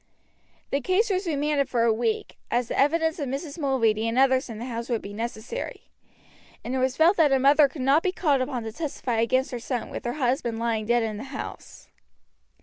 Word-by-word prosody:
The 280 - 0
case 375 - +1
was 375 0 -1
remanded 290 -2 0
for 240 -2 +1
a 230 -1 +4
week, 225 0 -2
as 240 0 0
the - - -2
evidence 320 +3 +2
of 285 - -2
Mrs. 280 +4 -5
Mulready 230 -6 +1
and 230 +2 -1
the - - +6
others 260 -1 +3
in 225 - -6
the 235 - -6
house 235 -1 -5
would 235 -3 -1
be 200 - -7
necessary, 230 - -6 0.7
and 245 - -4
it 265 - 0
was 260 0 0
felt 340 +5 +5
that 310 -4 +4
a 270 - +5
mother 280 +2 +5
could 265 -1 -6
not 275 +4 +4
be 370 - 0
called 295 -7 +1
upon 255 -2 -2
to 220 - -5
testify 255 -4 -3
against 255 +4 +1
her 245 - -4
son 245 0 -4
with - - -6
her 240 - -1
husband 250 -4 -1
lying 225 -2 -1
dead 240 0 +3
in 215 -2 -3
the 225 - -7
house. 275 +1 -8
260 Hz, 225 wpm, -25 LUFS, 235-290 Hz, 0.7 s, the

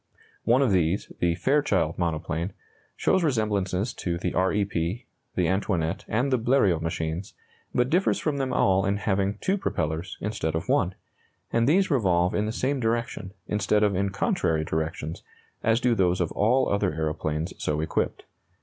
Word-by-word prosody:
One 125 +5 +4
of 125 - +2
these, 90 +1 +1
the 85 -1 +2
Fairchild 100 - +1
monoplane, 85 +1 -2 0.4
shows 190 - +2
resemblances 105 - 0
to 85 -2 -3
the 90 0 -2
R 95 +1 +2
E 105 0 +1
P, 90 +3 -3 0.3
the 90 - +2
Antoinette, 95 -4 -1
and 125 +6 0
the 130 - +3
Bleriot 110 -9 +3
machines, 80 +2 -3 0.4
but 125 0 +2
differs 180 +8 +2
from 150 -3 -1
them 130 -1 -1
all 95 -4 +3
in 100 +2 +1
having 100 -1 0
two 195 +2 +1
propellers 80 - -2
instead 100 -7 -2
of 80 - -3
one; 95 0 +2 0.6
and 115 +2 +3
these 190 +3 +3
revolve 90 -9 +2
in 105 +1 0
the - - -1
same 130 +4 -1
direction, 115 -4 -2
instead 105 +1 +1
of 100 -2 +2
in 100 +1 +1
contrary 80 -5 0
directions, 80 0 -3 0.4
as 115 +1 +3
do 125 -1 +2
those 90 -4 +2
of 85 -3 0
all 125 +6 +2
other 100 -5 0
aeroplanes 80 0 -2
so 75 0 -1
equipped. 80 - -1
95 Hz, 170 wpm, -26 LUFS, 85-115 Hz, 0.6 s, One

